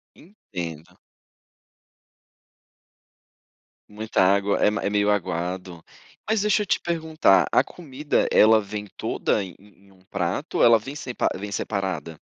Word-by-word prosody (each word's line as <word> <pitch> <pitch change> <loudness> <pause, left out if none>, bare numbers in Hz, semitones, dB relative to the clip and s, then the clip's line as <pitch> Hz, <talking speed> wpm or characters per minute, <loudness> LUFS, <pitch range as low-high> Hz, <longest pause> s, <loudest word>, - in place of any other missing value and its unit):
Entendo. 85 - -9 2.9
Muita 105 0 -1
água, 100 +2 +2
é - - +5
m 105 - -1
é 100 - 0
meio 105 0 +2
aguado. 90 -2 -3 0.4
Mas, 220 -2 +1
deixa 210 0 +2
eu - - -5
te - - +1
perguntar. 160 - +2
A - - +3
comida, 150 -3 -2
ela 110 0 +6
vem 105 0 -6
toda 105 - -1
em 90 -3 -9
em 100 -1 -22
em 95 - -22
um 95 - -24
prato 90 -4 -3
ou - - +5
ela 115 -1 +7
vem 135 +6 -8
sempa 130 -5 -2
vem 100 +2 -6
separada? 95 -5 -4
105 Hz, 140 wpm, -24 LUFS, 95-130 Hz, 2.9 s, ela